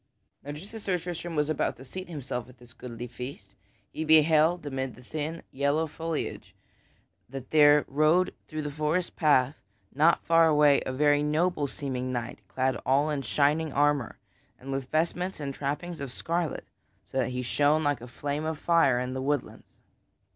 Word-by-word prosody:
Now 145 - -6
just 180 +9 -9
as 225 - -7
Sir 190 -3 0
Tristram 175 -1 -5
was 150 -1 +1
about 155 -2 -1
to 135 - -12
seat 185 +7 -7
himself 130 -6 -5
at 125 - -16
this 120 0 -15
goodly 120 -2 -7
feast 120 -4 -9 0.4
he 160 - -4
beheld 160 +1 +4
amid 135 -3 -3
the 125 - -15
thin 155 +4 -5
yellow 140 +4 +1
foliage 160 0 -5 0.7
that 135 0 -8
there 150 -1 +6
rode 155 +6 +3
through 155 -1 -5
a 145 - -3
forest 155 +4 -1
path 145 -3 +3 0.4
not 155 +5 +3
far 165 0 +5
away 150 -2 +5
a - - -1
very 145 +2 +3
noble 150 0 +1
seeming 130 -2 -4
knight 120 -2 -4
clad 130 0 0
all 140 +4 +2
in 145 -2 -1
shining 150 +3 +1
armor 145 -4 +1 0.4
and 135 +1 -8
with 135 -1 -3
vestments 170 +4 -1
and 140 -2 -4
trappings 150 +4 -4
of 140 -3 -5
scarlet 165 +3 -2 0.4
so 135 - -3
that 125 - +1
he 125 0 -3
shone 145 +5 +2
like 145 -4 0
a 120 - -8
flame 145 +4 -3
of 160 0 -2
fire 160 -7 +3
in 125 +1 -3
the 130 - -3
woodlands. 145 0 -3
145 Hz, 175 wpm, -28 LUFS, 130-160 Hz, 0.7 s, there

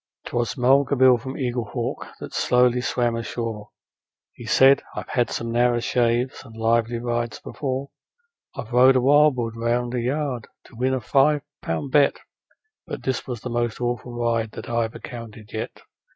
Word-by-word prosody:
'Twas 120 -1 -2
Mulga 135 +3 +4
Bill, 130 0 +7
from 130 +3 -6
Eaglehawk, 120 -5 -3
that - - -8
slowly 125 0 +3
swam 120 -2 0
ashore: 115 -2 -4 0.6
He - - -11
said, 135 +1 +6
'I've - - -6
had 120 -2 +1
some 115 0 -3
narrer 120 0 +3
shaves 120 +1 0
and 115 -3 -13
lively 115 +1 +1
rides 120 -1 -2
before; 135 -1 -4 0.7
I've 115 - -7
rode 130 +2 +6
a 130 - +4
wild 145 +2 +5
bull 115 -2 -2
round 120 +2 -1
a 125 - 0
yard 130 -2 -2 0.2
to - - -17
win 130 +3 +1
a 130 - -3
five 140 +5 +3 0.2
pound 85 +12 -3
bet, 145 0 +4 0.7
But - - -6
this 130 -2 -2
was 120 -4 -5
the 125 - -5
most 120 -1 -1
awful 120 0 -3
ride 115 -2 -1
that - - -8
I've 115 -1 -1
encountered 115 -3 -9
yet. 110 - -5
120 Hz, 165 wpm, -23 LUFS, 115-130 Hz, 0.7 s, Bill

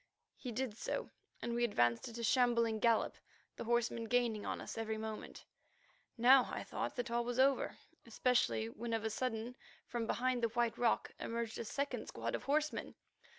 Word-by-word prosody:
He 250 - -6
did 235 -1 -2
so, - - -3 0.3
and 235 - -1
we 240 0 +1
advanced 120 - +2
at 235 - -8
a 235 - -4
shambling 235 -2 +3
gallop, 230 0 +2 0.4
the - - -6
horsemen 235 0 +1
gaining 230 -2 +1
on - - -2
us - - -6
every 220 -1 -2
moment. 220 0 -6 0.7
Now 250 +2 +7
I - - -3
thought - - -3
that 245 -2 -3
all 235 0 +1
was 245 0 -3
over, 270 +1 +3 0.3
especially 215 - +2
when 230 - -5
of 225 -1 0
a 220 - 0
sudden 235 +1 -2 0.3
from 235 -2 -3
behind 250 0 +1
the 230 - +2
White 235 0 +1
Rock 240 -2 +1
emerged 230 -1 -3
a 235 - -3
second 280 +6 -2
squad - - -3
of - - -3
horsemen. 300 +2 0
235 Hz, 180 wpm, -36 LUFS, 225-245 Hz, 0.7 s, Now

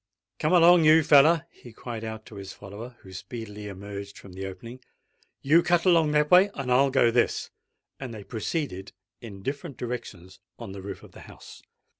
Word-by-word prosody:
"Come 155 - 0
along, 175 -1 +6
you 155 +1 +6
feller," 155 +3 +5
he 120 - -15
cried 115 0 -7
out 110 0 -7
to 105 - -12
his 95 -1 -8
follower, 110 +5 -10
who 95 - -14
speedily 105 +1 -8
emerged 100 0 -8
from 95 - -13
the 95 +1 -6
opening. 115 +6 -10 0.6
"You 155 +5 +5
cut 175 0 +1
along 165 -4 +4
that 150 0 +2
way, 185 +3 +7
and 130 -2 -4
I'll 135 +2 +4
go 120 -3 +3
this." 120 +1 0 0.5
And 130 -3 -6
they 110 -3 -9
proceeded 110 - -4 0.3
in 100 -5 -10
different 140 - -5
directions 100 -7 -7 0.2
on - - -8
the 95 0 -8
roof 100 - -8
of - - -15
the - - -14
house. - - -14
120 Hz, 185 wpm, -26 LUFS, 100-150 Hz, 0.6 s, way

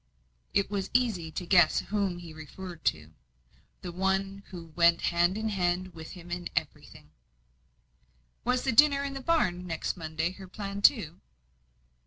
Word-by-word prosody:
It 200 0 +2
was 195 -2 -2
easy 220 -10 +1
to 170 +3 -5
guess 175 -3 +5
whom 200 -3 -1
he 170 -2 -10
referred 165 +2 -9
to 75 0 0 0.7
the 180 - -5
one 190 +2 -1
who 165 -3 -10
went 170 -1 +5
hand 175 +3 +2
in 220 0 -1
hand 185 -2 -1
with 160 -1 -9
him 175 -2 -11
in 175 0 -3
everything. 75 - -4 1.3
"Was 250 +1 +1
the 265 - +1
dinner 280 +3 +5
in 280 -1 -3
the 270 - -5
barn, 185 - +1
next 165 -2 -2
Monday, 160 0 -2
her 190 0 -11
plan, 200 +1 -6
too?" 190 - +3
185 Hz, 155 wpm, -29 LUFS, 170-200 Hz, 1.3 s, guess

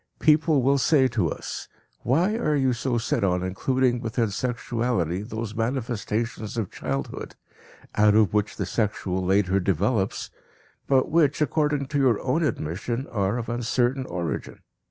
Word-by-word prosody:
People 155 -2 +3
will 140 +2 +3
say 135 -1 +4
to 105 -8 0
us: - - -6 0.3
"Why 170 - +2
are 155 -10 +1
you 130 -3 +2
so 120 0 -1
set 115 0 -1
on 90 -2 +1
including 125 +6 0
within 115 -2 -1
sexuality 115 -6 -1
those 110 0 -5
manifestations 115 -2 -2
of 110 -5 -2
childhood, 70 -2 -4 0.6
out 105 0 +4
of 105 -4 +4
which 105 0 0
the - - -2
sexual 95 -4 -1
later 95 +1 +2
develops, 95 +3 0 0.6
but 135 +1 +2
which, 155 -3 +3
according 150 -2 +1
to 145 - 0
your 125 -6 +3
own 135 +6 +1
admission, 115 - -2
are 100 0 0
of 115 - -4
uncertain 120 +2 0
origin? 85 -3 -4
115 Hz, 145 wpm, -25 LUFS, 100-130 Hz, 0.6 s, say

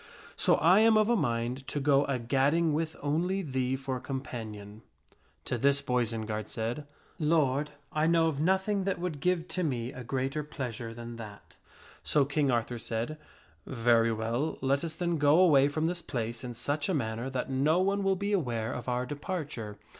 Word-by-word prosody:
So - - +3
I 175 +6 +5
am 220 0 +6
of 215 +1 +3
a 240 - +4
mind 120 - -1
to 145 - -2
go 140 0 +3
a 135 - -1
gadding 140 +7 +2
with 160 +1 -1
only 175 +7 0
thee 130 -3 -1
for 135 -1 -3
companion." 110 -6 -6 0.6
To 120 - -2
this 140 +2 +3
Boisenard 110 -4 -1
said, 120 +6 -3 0.2
" - - -32
Lord, 150 -2 +2 0.2
I 155 +1 +1
know 165 -1 +4
of 155 -3 -1
nothing 190 +3 +1
that 195 - 0
would 170 -4 -4
give 175 +2 0
to 185 - -1
me 125 -7 -2
a 125 - -7
greater 135 +4 -2
pleasure 120 -6 -5
than 115 0 -8
that." 105 -3 -10 0.5
So 145 -2 +2
King 140 0 +1
Arthur 120 0 0
said, 115 +7 -3 0.3
" - - -33
Very 115 -2 +3
well, 115 +7 -1
let 135 +2 +1
us 160 -2 -4
then 170 -1 -1
go 145 +3 +5
away 145 -7 +6
from 155 +2 -1
this 175 +1 -1
place 120 -6 -4
in 120 -1 -6
such 145 +6 -1
a 185 - +1
manner 115 -1 -2
that 130 0 -3
no 145 +6 +3
one 200 +2 +1
will 195 -1 +2
be 200 +2 -2
aware 120 - -1
of 125 0 -5
our 125 0 0
departure. 145 - -5
140 Hz, 190 wpm, -30 LUFS, 120-160 Hz, 0.6 s, am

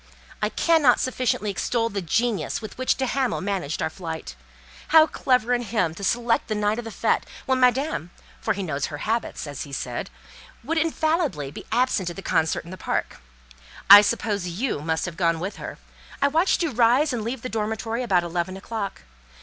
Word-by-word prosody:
"I 210 - +1
cannot 305 -2 +4
sufficiently 250 -5 0
extol 230 +3 0
the 200 -2 -3
genius 200 - 0
with 215 -2 -8
which 255 0 +1
de 265 - -1
Hamal 260 -2 0
managed 185 -6 -2
our - - 0
flight. 160 - -6 0.5
How 320 0 +7
clever 250 -5 +1
in 245 - +1
him 210 -8 0
to 200 - -9
select 235 +3 +1
the 215 - -1
night 210 +2 0
of 240 - -6
the - - -5
fête, - - +1 0.2
when 260 -1 +1
Madame 255 - +2 0.3
(for 220 - 0
he 200 - -3
knows 145 -5 -2
her 150 - -6
habits), 225 -5 -2
as 145 -2 -6
he 145 - -7
said, 125 -3 -4 0.5
would 320 +6 0
infallibly 310 - 0
be - - -10
absent 230 -6 +1
at 175 - -7
the 195 - -8
concert 160 -1 0
in 170 - -10
the 185 - -7
park. - - -2 0.7
I 205 0 +13
suppose 210 -3 -1
you 190 - -2
must 160 +1 -1
have 175 -3 -6
gone 170 -2 +1
with 190 +4 -4
her. - - -7 0.4
I 280 - +3
watched 330 +4 +2
you 330 - 0
rise 245 +5 +3
and 230 -3 -2
leave 235 +2 -4
the - - -2
dormitory 220 +1 -2
about 190 -8 +2
eleven 175 +2 -3
o'clock. 205 0 -5
220 Hz, 195 wpm, -24 LUFS, 180-250 Hz, 0.7 s, I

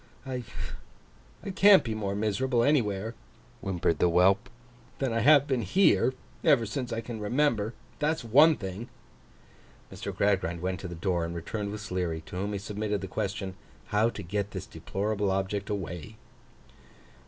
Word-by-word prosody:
I 130 -1 -3 1.1
can't 195 -3 +7
be 115 -4 -3
more 100 -2 -2
miserable 115 +4 +1
anywhere,' 115 -6 +1 0.5
whimpered 85 -4 0
the 90 - +4
whelp, 95 +4 +4 0.5
'than 135 -4 -1
I 115 - +1
have 140 +4 +6
been 130 -4 0
here, 130 - +3 0.3
ever 120 -5 +5
since 125 +3 -4
I 115 0 -2
can 115 -1 -6
remember. 115 -1 +1 0.2
That's 155 0 0
one 145 +8 +6
thing.' 100 +3 -6 1.0
Mr. - - -5
Gradgrind 95 -4 +1
went 90 +1 -2
to 95 - -6
the 85 - -7
door, 85 0 0
and 85 +1 -4
returned 100 +5 -4
with 105 0 -6
Sleary, 90 -5 -2
to 85 - -11
whom 100 +3 -2
he - - -1
submitted 105 0 -3
the 95 - -4
question, 95 +1 -3 0.4
How 105 +3 +3
to 100 - -7
get 100 +3 -2
this - - -6
deplorable 100 0 -2
object 95 +1 -1
away? 100 +1 -5
105 Hz, 155 wpm, -28 LUFS, 95-120 Hz, 1.1 s, can't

